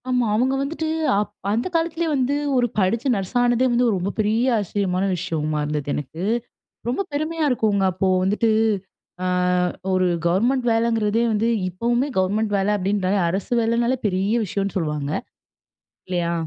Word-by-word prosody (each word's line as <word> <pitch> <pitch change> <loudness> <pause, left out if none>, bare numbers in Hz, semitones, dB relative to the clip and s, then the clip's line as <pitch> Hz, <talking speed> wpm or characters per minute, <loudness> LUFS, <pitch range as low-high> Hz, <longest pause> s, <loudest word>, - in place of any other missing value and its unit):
ஆமா. 250 -1 +2
அவங்க 255 +4 +2
வந்துட்டு 315 +3 -3 0.3
அப் 210 - -2 0.2
அந்த 230 +8 0
காலத்திலே 330 0 0
வந்து 265 +1 +1 0.2
ஒரு 245 -1 +3
படிச்சு 215 +6 +1
நர்ஸ் 195 +1 -4
ஆனதே 245 +1 +3
வந்து 240 +1 +2
ஒரு 220 - +2
ரொம்ப 190 +3 -2
பெரிய 225 +4 +2
ஆச்சரியமான 195 -2 -1
விஷயமா 155 -4 -2
இருந்தது. 150 -1 -3
எனக்கு, 155 +4 -5 0.6
ரொம்ப 250 +11 0
பெருமையா 310 +2 -1
இருக்குங்க. 210 -5 +1
அப்போ 190 +2 0 0.2
வந்துட்டு 210 +4 +1 0.7
ஆ - - -1 0.7
ஒரு 185 0 +2 0.2
கவர்மெண்ட் 240 +9 +2
வேலைங்கிறதே 225 -1 +1
வந்து, 215 +1 +1 0.2
இப்பவுமே 240 +8 0
கவர்மெண்ட் 205 +3 +1
வேலை 195 +1 +1
அப்படின்றாலே 195 0 0
அரசு 195 +6 -2
வேலனாலே 235 +3 +1
பெரிய 195 +2 +1
விஷயம்னு 195 0 -3
சொல்லுவாங்க. 150 -4 -2 1.0
இல்லையா? 175 -2 -1
210 Hz, 140 wpm, -22 LUFS, 185-245 Hz, 1.0 s, ஒரு